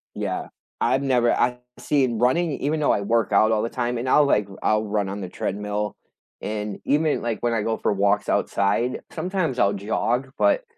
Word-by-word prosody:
Yeah, - - -3 0.3
I've 130 +1 +2
never 125 -3 +2
I've 125 0 +1 0.2
seen 130 -6 0
running 160 +8 +2
even 145 +3 -1
though 150 - +3
I 100 - +1
work 110 0 +1
out 110 +2 +4
all 110 -1 +2
the 115 - -2
time, 120 -1 -2
and 120 +2 -3
I'll, 150 +2 +5
like, 105 -7 +2 0.2
I'll 110 0 +2
run 105 -2 -1
on 100 +1 -5
the 95 - -5
treadmill, 105 +2 -3 0.5
and 105 -1 -4
even, 150 +1 +1
like, 115 -2 -2
when 120 -1 0
I 115 - 0
go 110 +1 -1
for - - 0
walks 100 +1 +1
outside, 115 +5 +1
sometimes 165 -6 -2
I'll 100 - +3
jog, 115 +6 -1
but, - - +3
115 Hz, 195 wpm, -23 LUFS, 105-135 Hz, 0.5 s, I'll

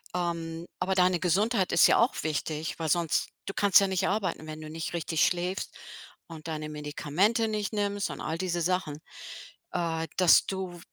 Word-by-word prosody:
Ähm, 170 -1 -3
aber 190 +1 0
deine 180 -1 +3
Gesundheit 195 +3 +1
ist - - +6
ja - - +4
auch 235 +3 +1
wichtig, 155 +1 -3
weil 160 - -2
sonst 170 -1 +1 0.2
du 195 - -5
kannst 200 -2 +5
ja 195 - +2
nicht 190 -2 0
arbeiten, 195 -6 -2
wenn 155 0 -7
du 155 - -8
nicht 160 +2 -5
richtig 165 -1 +1
schläfst 180 +1 -2 0.5
und 165 -1 -10
deine 155 -1 -4
Medikamente 150 - 0
nicht 215 0 -2
nimmst 205 -1 -1
und - - -7
all 160 +2 -3
diese 175 -1 -2
Sachen. 170 -4 -1 0.7
Äh, 165 -1 -2
dass 180 -2 +6
du 185 -2 -4
175 Hz, 175 wpm, -28 LUFS, 160-190 Hz, 0.7 s, ist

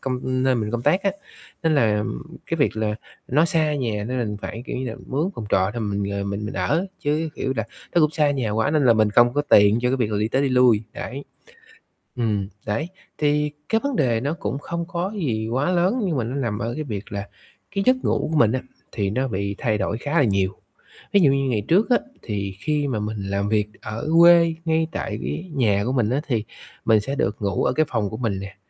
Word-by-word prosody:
công 130 -1 -2 0.3
nơi 130 -1 +3
mình 110 -2 -1
công 120 0 -2
tác 185 +8 +3
á, 195 - +2 0.5
nên 160 -1 +3
là 105 -6 +2 0.4
cái - - -1
việc - - +1
là 105 -1 0 0.3
nó 150 +5 +4
xa 155 -2 +1
nhà, 110 -7 -2
nên 130 +2 -2
mình 105 -3 -2
phải, 115 - -5
kiểu - - -4
như 130 - -3
là, 115 - -5
mướn 155 +8 -1
phòng 110 - -6
trọ 95 +1 +3
để 120 - -3
mình, 100 -1 -1
ờ, 100 0 -2
mình 100 +1 -3
mình - - -6
ở, 100 - 0
chứ, 155 +2 0
kiểu 130 - -2
là, 110 - 0 0.3
nó 175 - +5
cũng 155 -1 +4
xa 150 -2 +2
nhà 130 -6 -1
quá 110 +6 +1
nên 150 -3 +2
là 115 - +7
mình 110 -1 +3
không 120 +2 +5
có 145 - +2
tiền 105 -5 +5
cho 125 - +2
cái 130 - +1
việc 120 -4 0
là 105 - 0
đi 105 +1 0
tới 135 +4 +1
đi 140 - +2
lui, 125 -4 +4
đấy. 140 +2 -6 0.9
Ừm, 105 -5 0 0.2
đấy, 115 +10 -1 0.3
thì 150 0 +1 0.2
cái 225 0 +2
vấn 280 -3 -1
đề 120 - +2
nó 140 +5 -1
cũng 135 -6 -3
không 170 +2 -4
có 185 +3 -3
gì 115 - -1
quá 135 +9 0
lớn, 185 +8 +2
nhưng 165 -6 0
mà 120 - 0
nó 120 +4 -4
nằm 115 -7 -2
ở 115 +2 -2
cái 155 - -3
việc 105 -7 -6
là 100 0 -4 0.5
cái 195 - +1
giấc 255 - +6
ngủ - - 0
của 160 - +1
mình 110 -4 +5
á, 130 - -1 0.3
thì 100 -3 -1
nó 130 +5 0
bị 100 -2 -2
thay 110 -4 0
đổi 100 +2 -1
khá 145 +6 -4
là - - +5
nhiều. 95 -3 +1 0.6
Ví 200 - +6
dụ 145 -6 +5
như 135 -1 +1
ngày 105 -5 0
trước 195 +9 +3
á, 245 - +5 0.2
thì 100 -3 -4
khi 145 +4 0
mà 115 -5 -1
mình 105 +1 -3
làm 100 +1 -1
việc 105 -1 +2
ở 110 +8 -5
quê, 170 -1 +7
ngay 160 0 +2
tại - - -4
cái 185 +2 -4
nhà 105 -6 +2
của 125 - 0
mình 115 -5 +2
á 135 +4 0
thì 115 -6 0 0.4
mình 110 -1 +5
sẽ 135 +7 -3
được 105 -7 0
ngủ 100 -1 0
ở 125 - +2
cái 155 +3 +2
phòng 105 -5 -1
của 110 - -6
mình 110 -6 -1
nè, 100 +1 -8
120 Hz, 250 wpm, -23 LUFS, 105-150 Hz, 0.9 s, là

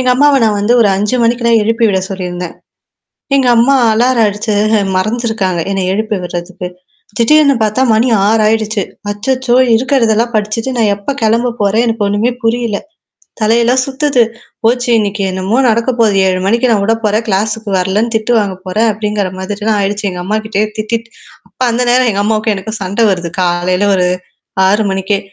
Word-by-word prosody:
எங்க 255 0 +1
அம்மாவ 285 +1 +4
நான் 210 -2 +1
வந்து 215 +4 +2
ஒரு 220 - +4
5 210 +5 0
மணிக்கு 235 +1 +1
தான் 230 -1 +4
எழுப்பி 230 +2 0
விட 190 -2 +1
சொல்லியிருந்தேன். 180 -2 -5 0.8
எங்க 270 -2 +2
அம்மா 260 +4 +4 0.2
அலார்ம் 235 +1 +2
அடிச்சு 210 +2 -3 0.4
மறந்துருக்காங்க, 215 -3 -1
என்ன 195 - -1
எழுப்பி 215 +1 -1
விடுறதுக்கு. 175 +1 -6 0.5
திடீர்னு 280 +4 +4
பார்த்தா 215 +4 0
மணி 225 +3 +2 0.2
6 220 +1 +2
ஆயிடுச்சு. 220 -1 0 0.3
அச்சச்சோ! 250 +4 -1 0.2
இருக்கிறதெல்லாம் 235 -2 +1
படிச்சுட்டு, 215 +4 -1
நான் 220 -3 +2
எப்ப 205 +7 -4
கிளம்ப 230 +3 +1
போறேன்? 205 +3 +2
எனக்கு 225 -2 -1
ஒண்ணுமே 205 +4 0
புரியல. 230 -2 0 0.6
தலையெல்லாம் 235 +4 +2
சுத்துது. 275 -2 +1 0.4
போச்சு 245 +2 +1
இன்னக்கு 205 -1 -2
என்னமோ 190 +4 -2
நடக்க 235 +3 +1
போது. 220 -3 +3
7 185 -1 +1
மணிக்கு 235 +4 +2
நான் 210 -3 +2
விட 225 - +2
போறேன். 215 +2 +1
கிளாஸ்க்கு 215 +2 -1
வரலன்னு 200 +5 0
திட்டு 220 +2 0
வாங்க 200 -3 -1
போறேன். 215 +5 +1
அப்டிங்கிற 210 -2 -2
மாதிரிலாம் 205 +3 -2
ஆயிடுச்சு. 205 +1 -2
எங்க 180 -1 -6
அம்மாட்டயே 215 +1 -1
திட்டிட்டு 230 +2 -3 0.4
அப்ப - - -44
அந்த 240 +2 0
நேரம் 250 0 +3
எங்க 200 -1 -1
அம்மாவுக்கும் 215 0 0
எனக்கும் 215 +3 -6
சண்டை 200 +5 0
வருது, 175 -3 -2
காலையில 180 +2 0
ஒரு 180 -1 +1 0.6
6 210 +3 +2
மணிக்கே. 195 +1 -1
220 Hz, 165 wpm, -13 LUFS, 200-235 Hz, 0.8 s, அம்மாவ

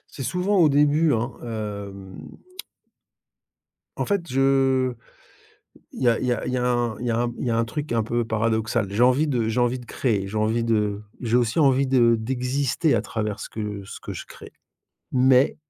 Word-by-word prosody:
C'est - - -6
souvent 180 - 0
au 160 - +6
début, 150 +2 +3
hein, 120 +3 -2
hem. 100 -4 -6 1.8
En - - -1
fait, 200 -2 0
je 135 -1 +2 1.0
il - - -7
y 125 - +4
a 115 - +2
il - - -2
y 125 - +2
a 120 - -2
il 125 - -2
y 130 - 0
a 125 - 0
un 120 -2 0
il 125 - -4
y - - +1
a 115 - 0
un 120 - +1
m 120 - -2
il - - -3
y - - +1
a 115 - +1
un 115 - +2
truc 145 +5 -5
un 115 -2 +1
peu 120 +2 -1
paradoxal. 110 -1 0
J'ai 110 +4 +1
envie 130 +5 +4
de 120 -6 0
j'ai 115 - -1
envie 120 +1 +1
de 120 - -12
créer, 105 -8 -1
j'ai 110 - -6
envie 110 +2 +1
de 105 -3 0 0.2
j'ai 120 -1 +1
aussi 120 +2 +1
envie 135 -2 +3
de 120 -3 +4
d'exister 130 +6 0
à - - +1
travers 105 -2 -4
ce - - -6
que 105 -2 -5
ce - - -9
que - - -8
je - - -7
crée. - - -13 0.6
Mais 130 +1 +4
120 Hz, 215 wpm, -24 LUFS, 110-135 Hz, 1.8 s, au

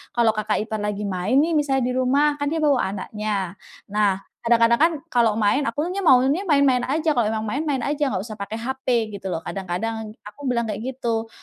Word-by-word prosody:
kalau 235 -2 +4
kakak 215 -1 -1
ipar 220 0 -3
lagi 210 0 -2
main 195 +5 0
nih, 330 +2 +1
misalnya 270 -3 +1
di - - -1
rumah, 285 +3 +2
kan 285 - -1
dia 320 +1 -1
bawa 275 -10 +2
anaknya. 200 -2 -3 0.3
Nah, 200 -2 +1 0.2
kadang-kadang 235 0 +3
kan 325 +3 +5 0.2
kalau 230 -3 +3
main, 225 +6 +2
akunya 330 +11 -2
maunya 285 +2 +3
main-main 280 -5 +4
aja, 310 +4 +1
"Kalau 240 -7 +1
memang 215 0 -2
main, 220 +7 -2
main 270 -3 0
aja, 290 0 0
enggak 195 -7 -2
usah 215 -1 -9
pakai 200 +2 -5
HP." 240 -2 -1
gitu 195 - -6
lho. 165 -2 -3
Kadang-kadang 215 +4 -4
aku 265 +7 -8
bilang 240 -2 +1
kayak 210 -2 -4 0.2
gitu, 230 -3 -2
235 Hz, 200 wpm, -23 LUFS, 210-280 Hz, 0.3 s, kan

